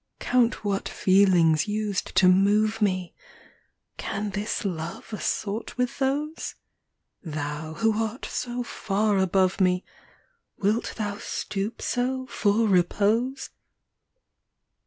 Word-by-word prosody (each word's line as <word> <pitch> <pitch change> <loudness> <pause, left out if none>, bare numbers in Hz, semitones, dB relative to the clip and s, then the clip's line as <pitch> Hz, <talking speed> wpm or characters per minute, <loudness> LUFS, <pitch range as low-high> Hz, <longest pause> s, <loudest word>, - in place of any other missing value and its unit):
vn. - - -8
Count 240 -3 +2
what 200 -1 -1
feelings 185 -4 +4
used 210 -2 -2
to 185 - +6
move 210 +4 +3
me! 185 -3 0 0.8
Can 205 +1 -3
this 205 +2 -3
love 170 +3 -5
assort 215 +2 -3
with 250 +2 -1
those? 290 +4 -1 0.7
Thou, 155 -1 -5
who 225 +6 +2
art 225 +3 -5
so 245 0 -3
far 210 -2 0
above 190 +1 +2
me, 180 0 +2 0.7
Wilt 210 +4 0
thou 205 -2 -3
stoop 205 +2 -4
so, 260 +1 -1
for 220 -2 +1
repose 210 +7 +1
205 Hz, 110 wpm, -26 LUFS, 185-225 Hz, 0.8 s, to